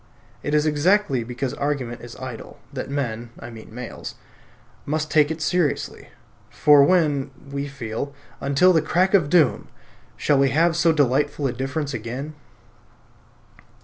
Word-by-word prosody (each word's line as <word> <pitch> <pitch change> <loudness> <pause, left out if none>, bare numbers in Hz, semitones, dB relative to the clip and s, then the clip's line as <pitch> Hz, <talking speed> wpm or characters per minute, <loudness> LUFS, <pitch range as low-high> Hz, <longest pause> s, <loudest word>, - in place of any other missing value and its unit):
It 145 - -1
is 150 0 +3
exactly 155 - +2
because 125 +2 -4
argument 135 -5 -3
is 120 -1 -10
idle 130 -3 -8 0.2
that - - -5
men 120 -5 -3
(I 120 - -9
mean 110 -1 -12
males) 125 +1 -7 0.7
must 155 +1 -2
take 150 -2 +4
it 160 -1 -3
seriously; 175 -5 -1 0.4
for 145 -1 +6
when 145 -5 +2 0.2
(we 140 0 -3
feel), 140 -1 -5 0.3
until 145 +7 +4
the 160 - +4
crack 180 +5 +1
of 170 -8 +4
doom, 165 -1 +3 0.5
shall 145 -2 +2
we 135 0 +4
have 165 +4 +2
so 170 0 +4
delightful 145 0 +1
a 130 - 0
difference 135 +3 -3
again? 125 +6 -5
145 Hz, 145 wpm, -23 LUFS, 130-155 Hz, 0.7 s, for